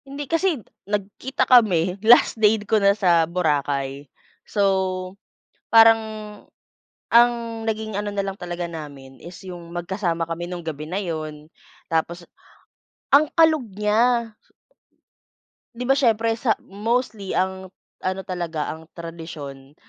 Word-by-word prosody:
Hindi, 280 +1 -6
kasi 330 +3 +1 0.3
nagkita 210 +6 -2
kami, 185 -8 +4
last 230 +3 +6
day 210 0 +3
ko 215 0 +2
na 200 +1 +4
sa 170 -5 +3
Boracay. 140 -5 -1 0.4
So, 190 -2 0 0.6
parang 225 0 +7 1.1
ang 240 +1 +7 0.4
naging 220 -1 -3
ano 205 +1 -2
na 200 -1 -2
lang 195 - -3
talaga 175 -1 -4
namin 145 -5 -10
is 175 +1 -10
yung 175 -2 -9
magkasama 175 -1 -2
kami 170 +1 -5
nung 175 -2 -7
gabi 155 -1 -5
na 185 - -1
yun. 155 -5 -5 0.4
Tapos, 170 +2 -2 0.8
ang 290 +2 +6
kalog 315 -5 +4
niya! 225 +3 +2 1.4
Di 240 - -6
ba 270 +2 +3
siyempre 230 -3 +2
sa 225 -2 +2
mostly 215 0 -2
ang 190 0 -2 0.3
ano 185 +1 -2
talaga, 170 -5 -4
ang 160 +1 -9
tradisyon, 155 -5 -9
190 Hz, 125 wpm, -23 LUFS, 165-220 Hz, 1.4 s, parang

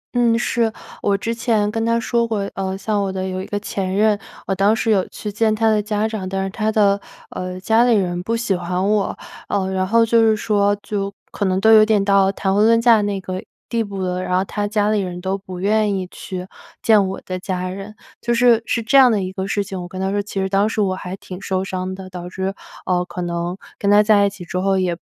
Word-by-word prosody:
嗯， 235 -1 +3
是， 235 -1 +1 0.3
我 200 -1 +2
之 225 +3 -2
前 220 -3 +1
跟 225 +1 -2
他 230 0 +2
说 235 0 0
过， 205 -3 -2
呃， 190 0 -3
像 205 +1 -1
我 195 -1 -1
的 190 0 -3
有 185 0 -3
一 - - -7
个 205 - -2
前 195 -2 -3
任， 210 0 +3 0.3
我 195 - -1
当 200 +3 +3
时 225 0 0
有 195 -3 +2
去 210 - -6
见 215 +1 +1
他 225 +1 +1
的 215 -1 +2
家 210 +1 -1
长， 210 -4 -4
但 190 0 -2
是 195 - -3
他 215 +1 -1
的， 200 -2 +3 0.3
呃， 185 0 -5
家 220 +5 +3
里 245 -2 +4
人 175 -3 0
不 230 +5 -1
喜 230 -4 0
欢 180 +2 -2
我。 210 -2 0 0.3
呃， 190 -2 -1
然 185 0 0
后 230 +3 +4
就 230 0 +4
是 220 -1 +4
说 205 -1 +1
就 200 -1 -3 0.2
可 205 - -2
能 190 0 +1
都 220 +3 +5
有 215 -1 +8
点 215 -2 +2
到 195 -1 +4
谈 195 -1 -1
婚 205 +2 +3
论 230 +1 +5
嫁 230 -2 +5
那 205 -1 -1
个 185 0 -5 0.2
地 230 -1 0
步 200 -2 -5
了， 180 0 -2
然 180 0 0
后 190 - +1
他 205 +1 -2
家 210 0 +1
里 215 - +2
人 180 -2 -4
都 190 +2 -2
不 185 -2 -8
愿 210 +1 +2
意 190 -1 -2
去 185 -1 -7 0.4
见 210 -3 +5
我 190 - -5
的 185 0 -4
家 185 -1 -3
人。 195 +3 -7 0.3
就 235 0 0
是 235 -1 +5
是 230 - 0
这 220 - 0
样 255 -2 +7
的 215 - +1
一 185 0 -5
个 190 0 -3
事 205 0 0
情 190 -2 -6
我 175 - -6
跟 185 +1 -8
他 190 0 -1
说， 205 0 0
其 200 -1 -5
实 190 - 0
当 200 +2 +2
时 220 - -3
我 195 -3 +2
还 185 0 -6
挺 185 -1 -10
受 190 -1 -1
伤 185 0 -4
的， 190 0 -9
导 180 -1 -7
致， 190 +1 -3 0.3
呃， 180 -1 +1
可 180 0 -6
能 175 +1 -3 0.2
跟 200 - 0
他 205 +1 +6
在 205 -1 +4
一 - - 0
起 195 -3 -10
之 180 +2 -3
后， 195 +1 +1
也 180 -2 0
200 Hz, 275 characters per minute, -20 LUFS, 185-215 Hz, 0.4 s, 有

